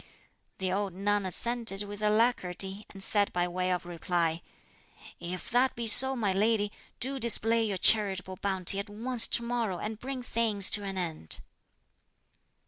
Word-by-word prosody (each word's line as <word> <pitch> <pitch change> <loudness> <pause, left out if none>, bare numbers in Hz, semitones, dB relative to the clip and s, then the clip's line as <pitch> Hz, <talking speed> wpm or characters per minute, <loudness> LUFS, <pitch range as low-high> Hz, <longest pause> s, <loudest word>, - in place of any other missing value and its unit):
The 190 -1 -3
old 200 -1 -3
nun 205 0 -1
assented 230 0 +2
with 205 0 -9
alacrity, 210 -3 -1
and 195 -1 -6
said 205 -1 +1
by 175 0 -1
way 180 +1 -3
of 180 -1 -3
reply, 170 -1 -2 0.8
"If 175 +1 -7
that 250 +2 +1
be 235 - -5
so, 265 +4 +6
my 210 -6 -1
lady, 210 +1 0 0.3
do 270 +2 -3
display 230 -1 +2
your 200 -3 -2
charitable 190 -2 +3
bounty 195 0 +4
at 200 +1 -6
once 230 +3 +2
to 235 - 0
morrow 235 -6 -3
and 215 +3 -6
bring 260 0 -6
things 220 -5 +1
to 205 - +1
an 195 -1 -6
end." 160 - -3
205 Hz, 155 wpm, -28 LUFS, 185-230 Hz, 0.8 s, so